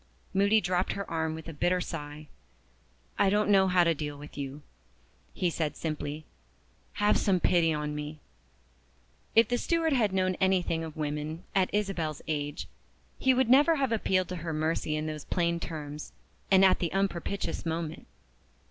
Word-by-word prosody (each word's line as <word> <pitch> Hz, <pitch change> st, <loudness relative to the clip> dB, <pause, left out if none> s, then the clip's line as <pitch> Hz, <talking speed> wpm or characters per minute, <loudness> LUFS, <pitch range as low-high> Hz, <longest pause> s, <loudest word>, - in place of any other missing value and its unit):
Moody 200 Hz, +3 st, +4 dB
dropped 185 Hz, -2 st, 0 dB
her 200 Hz, -1 st, -5 dB
arm 160 Hz, -1 st, -1 dB
with 160 Hz, 0 st, -9 dB
a 165 Hz, -, -6 dB
bitter 175 Hz, +4 st, +1 dB
sigh. 150 Hz, -3 st, -6 dB, 0.9 s
"I 195 Hz, -, +5 dB
don't 210 Hz, +1 st, +2 dB
know 190 Hz, -1 st, +5 dB
how 180 Hz, -1 st, +4 dB
to 170 Hz, -1 st, +3 dB
deal 150 Hz, -1 st, -5 dB
with 145 Hz, +1 st, -11 dB
you," 140 Hz, +1 st, -6 dB, 0.7 s
he 180 Hz, -2 st, 0 dB
said 155 Hz, -2 st, -2 dB
simply. 155 Hz, -1 st, -4 dB, 0.7 s
"Have 205 Hz, 0 st, +2 dB
some 190 Hz, -3 st, +2 dB
pity 170 Hz, -2 st, +3 dB
on 150 Hz, -1 st, -2 dB
me!" 150 Hz, +1 st, -6 dB, 1.2 s
If 225 Hz, -1 st, +6 dB
the 245 Hz, 0 st, +1 dB
steward 330 Hz, -2 st, +1 dB
had 225 Hz, -6 st, +2 dB
known 185 Hz, -1 st, +1 dB
anything 180 Hz, -3 st, +2 dB
of 160 Hz, -1 st, -8 dB
women 150 Hz, +2 st, -3 dB
(at 190 Hz, -1 st, +2 dB
Isabel's 185 Hz, -8 st, -2 dB
age) 145 Hz, -2 st, -3 dB, 0.5 s
he 265 Hz, -, +4 dB
would 260 Hz, -1 st, +3 dB
never 290 Hz, +7 st, +6 dB
have 270 Hz, -5 st, 0 dB
appealed 185 Hz, -5 st, +1 dB
to 180 Hz, -, -4 dB
her 165 Hz, -1 st, -4 dB
mercy 155 Hz, 0 st, -1 dB
in 155 Hz, 0 st, -2 dB
those 155 Hz, -2 st, -5 dB
plain 170 Hz, -1 st, 0 dB
terms, 150 Hz, -2 st, -6 dB, 0.4 s
and 195 Hz, 0 st, +6 dB
at 185 Hz, -, +4 dB
the 170 Hz, -, -1 dB
unpropitious 195 Hz, -2 st, -2 dB
moment. 165 Hz, -1 st, -4 dB
170 Hz, 165 wpm, -29 LUFS, 155-195 Hz, 1.2 s, If